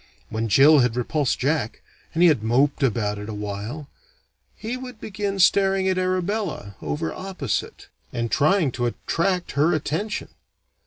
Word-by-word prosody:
When 110 +1 -2
Jill 145 +7 +7
had 125 -2 +2
repulsed 135 +3 0
Jack, 135 -4 -1 0.3
and 170 - +3
he 175 - +8
had 145 -9 +2
moped 135 +7 +2
about 110 -5 0
it 105 +1 -7
awhile, 105 +7 -5 0.7
he 225 +3 -4
would 250 -3 -8
begin 200 -1 -3
staring 195 +1 +4
at 185 -1 +1
Arabella, 185 - -2
over 160 +2 -3
opposite, 185 - -4 0.2
and 115 -1 -3
trying 155 0 +3
to 120 0 -1
attract 180 +8 -1
her 155 +5 +2
attention. 165 +8 -3
150 Hz, 145 wpm, -23 LUFS, 120-190 Hz, 0.7 s, he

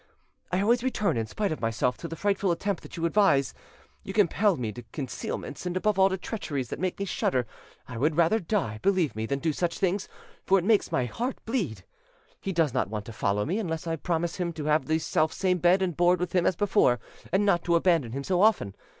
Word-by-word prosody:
"I 185 +1 +1
always 235 +4 +3
return, 215 - 0
in 115 -1 -1
spite 205 - -2
of 155 - -4
myself, 115 +2 0
to 170 - -6
the 165 - -6
frightful 200 +1 0
attempt 195 +3 -1
that - - -11
you 165 - -1
advise. 170 - +3 0.5
You 195 - -6
compel 205 -1 +3
me 115 -4 -3
to 120 - -9
concealments, 140 +5 -5
and 180 +1 -2
above 205 +1 +1
all 190 0 +6
to 190 - -2
treacheries 145 - -4
that - - -5
make 185 +1 -1
me 200 - -2
shudder; 130 -9 0 0.4
I 120 -2 -6
would 150 +4 +1
rather 170 +6 +4
die, 165 - -2
believe 185 - +1
me, 110 +1 -3
than 140 - -1
do 160 +2 -1
such 170 +2 -1
things; 190 +1 0 0.3
for 195 - +4
it 180 - -1
makes 215 -1 +3
my 125 - +1
heart 245 - -3
bleed. 180 - -2 0.6
He 195 - -3
does 165 -7 +1
not 130 -6 0
want 105 -1 -4
to 115 - -8
follow 105 0 0
me 185 +8 -1
unless 165 -6 -3
I 165 -1 -1
promise 170 +1 -2
him 175 -2 -2
to 155 -2 -6
have 155 +1 +2
the 160 +1 +2
selfsame 180 +3 0
bed 180 +2 +4
and 175 -4 -1
board 175 +2 +3
with 180 - -3
him 180 -2 +3
as 185 - +2
before, 190 - +3 0.3
and 195 +3 +2
not 175 -4 +2
to 170 -1 +3
abandon 165 -8 +2
him 140 +1 -3
so 180 +3 +1
often. 200 - +3
175 Hz, 230 wpm, -27 LUFS, 140-195 Hz, 0.6 s, all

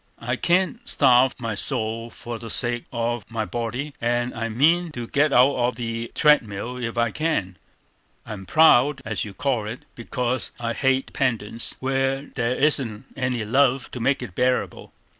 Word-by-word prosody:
I 120 +2 -2
can't 185 - +1
starve 130 -2 +4
my 115 -3 -4
soul 115 0 -3
for 120 0 -8
the 115 - -8
sake 120 +1 +3
of 120 -2 -2
my 115 -2 -2
body, 120 +6 -4
and 120 +1 0
I 115 0 -3
mean 160 +9 +2
to 120 -3 -5
get 145 +5 +1
out 130 +2 +5
of 120 -1 0
the 115 -1 -4
treadmill 125 -5 +2
if 120 -1 -4
I 115 -1 +1
can. 130 - -1 0.7
I'm 105 -4 -8
proud, 145 -3 +5
as 110 -1 -2
you 100 -2 -10
call 130 -4 -1
it, 115 +3 -7
because 125 +1 -3
I 115 -1 -2
hate 135 +2 +1
dependence 115 -3 -1
where 135 +1 0
there 125 0 -1
isn't 135 -6 +1
any 125 -4 -2
love 130 +2 +2
to 125 - -6
make 130 +2 0
it 110 -8 -8
bearable. 125 +5 -1
120 Hz, 165 wpm, -23 LUFS, 115-135 Hz, 0.7 s, out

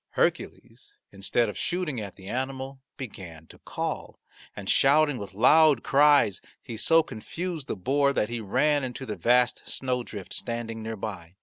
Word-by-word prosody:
Hercules, - - -2 0.2
instead 100 +4 0
of 105 - -5
shooting 170 -9 -2
at 100 -3 -7
the 95 -1 -13
animal, 130 +2 -4 0.2
began 90 - -9
to - - -15
call, - - -5 0.4
and 100 -2 -8
shouting 145 +1 +4
with 100 -2 -8
loud 155 +7 +5
cries 140 -9 +4 0.2
he 115 - -8
so 165 +9 +4
confused 160 +5 -6
the - - -2
boar 140 +8 +2
that 105 - 0
he 120 -1 -4
ran 145 +8 +2
into 130 +1 -5
the 105 - -4
vast 125 +1 +2
snowdrift 125 -6 -4
standing 115 -1 -4
near 110 0 -5
by. 95 -4 -7
125 Hz, 160 wpm, -27 LUFS, 105-140 Hz, 0.4 s, loud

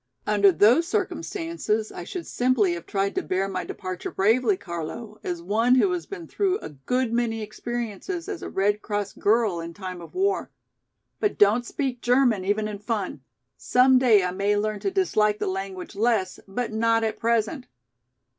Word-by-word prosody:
"Under 205 -2 +5
those 230 - +4
circumstances, 335 - -2
I 175 - -7
should 345 - -6
simply 245 -7 +2
have 170 -1 -7
tried 195 0 0
to - - 0
bear 190 +1 -1
my 185 -2 -3
departure 185 -2 -5
bravely, 250 - +2
Carlo, 200 - -6
as 175 -1 -4
one 225 +7 +3
who 365 +9 +4
has 355 -1 -3
been 370 -4 -7
through 390 -2 0
a - - -8
good 230 - -2
many 225 -2 0
experiences 240 - -5
as 405 -6 -5
a - - -5
Red 205 +2 +1
Cross 205 -2 -3
girl 210 -4 +2
in 165 0 -7
time 185 -3 -6
of 170 - -12
war. 390 +2 0 0.7
But 420 - 0
don't 220 +4 +4
speak 260 -4 -3
German 245 -5 +3
even 205 +2 0
in 210 -1 -6
fun. 210 - -3 0.4
Some 255 +1 +4
day 225 -6 +5
I 180 - -1
may 200 +2 +1
learn 210 0 -1
to - - -1
dislike 215 - +2
the - - -2
language 190 0 -4
less, 210 -4 +1
but 220 +4 -3
not 225 +1 +2
at 220 - -2
present. 235 +4 0
215 Hz, 175 wpm, -25 LUFS, 195-250 Hz, 0.7 s, Under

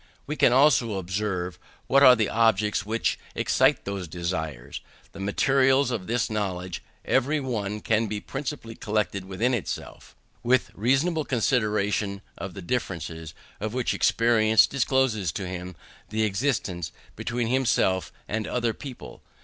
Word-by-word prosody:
We 150 - -3
can 125 - +4
also 125 -5 +4
observe 95 -2 -3 0.3
what 140 +1 +4
are 130 -3 +9
the 110 -3 +1
objects 110 -2 +2
which 115 +1 0 0.2
excite - - +2
those 100 -3 -4
desires. 80 -6 -4 0.3
The - - -11
materials 135 +6 +3
of 105 -6 -3
this 120 +2 0
knowledge 95 -4 -3 0.2
every 140 +4 +2
one 105 -6 -3
can 110 0 +1
principally 135 -4 -5
collect 105 -1 -1
within 100 +6 -1
himself; 115 -7 -5 0.3
with 125 +1 +2
reasonable 140 - +1
consideration 105 -6 0
of 95 -1 -7
the 95 - -7
differences, 80 -7 -4 0.2
of 110 +3 -4
which 125 -2 0
experience 110 -1 +4
discloses 130 - +1
to 95 - -4
him 90 0 -6 0.3
the 110 +1 0
existence, 100 - -1 0.2
between 120 -1 -2
himself 120 -7 +1 0.2
and 110 0 -2
other 120 -2 0
people. 130 0 -10
110 Hz, 135 wpm, -26 LUFS, 95-125 Hz, 0.3 s, are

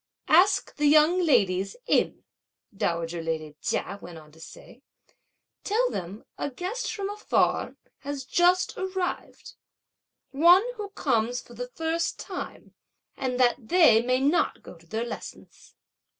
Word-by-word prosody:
"Ask 380 +4 +4
the 295 0 +2
young 310 +5 +5
ladies 195 - +2
in," - - +1 0.5
dowager 170 -2 -2
lady 160 -2 -4
Chia 200 - -2
went 170 -1 -10
on 155 -1 -15
to 160 - -19
say; 195 - -13 0.8
"tell 480 +4 +1
them 190 +5 -6
a - - -2
guest 365 - -4
from 400 -2 -4
afar 415 +1 0 0.2
has 280 -2 -6
just 355 +6 +2
arrived, 375 -1 -4 0.8
one 345 +7 +6
who 415 -2 -5
comes 245 - 0
for 240 - -14
the 245 +1 -6
first 325 +5 -2
time; - - -8 0.4
and 255 -2 -3
that 245 -2 +2
they 330 -11 +6
may 255 +2 +1
not 285 +6 +1
go - - -11
to 165 0 -21
their 220 +6 -3
lessons." 240 - -10
270 Hz, 135 wpm, -26 LUFS, -, 0.8 s, one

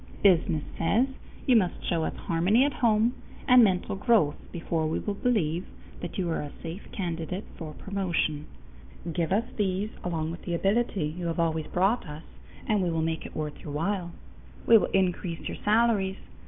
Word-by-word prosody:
Business 165 -5 +4 0.2
says: 225 +11 +3 0.4
you 255 - +5
must 185 -6 +3
show 165 -2 +1
us - - -3
harmony 185 +10 +2
at 290 - 0
home 230 0 +3 0.3
and 250 -1 +8
mental 190 -2 +1
growth 200 -8 +3 0.2
before 165 -2 -1
we 155 - -1
will 205 - -2
believe 190 -7 0 0.3
that - - -6
you 185 -3 0
are - - -1
a 145 - -6
safe 165 +5 -7
candidate 175 +1 -3
for 155 -3 -7
promotion. 175 -6 -1 0.7
Give 170 -1 -1
us 215 +4 +2
these 200 +1 0
along 160 -2 -2
with 170 - -8
the 175 - -2
ability 195 0 +1
you 170 +3 -4
have 165 0 -2
always 160 -2 0
brought 195 +4 +1
us, 150 +2 -8 0.4
and 210 -3 +2
we 180 - +1
will 165 -1 0
make 160 0 -2
it - - -14
worth 150 -1 -4
your 145 - -7
while. 175 +2 -1 0.5
We 230 - +7
will - - 0
increase 180 -2 0
your - - -5
salaries. 210 -3 +3
180 Hz, 180 wpm, -28 LUFS, 165-205 Hz, 0.7 s, and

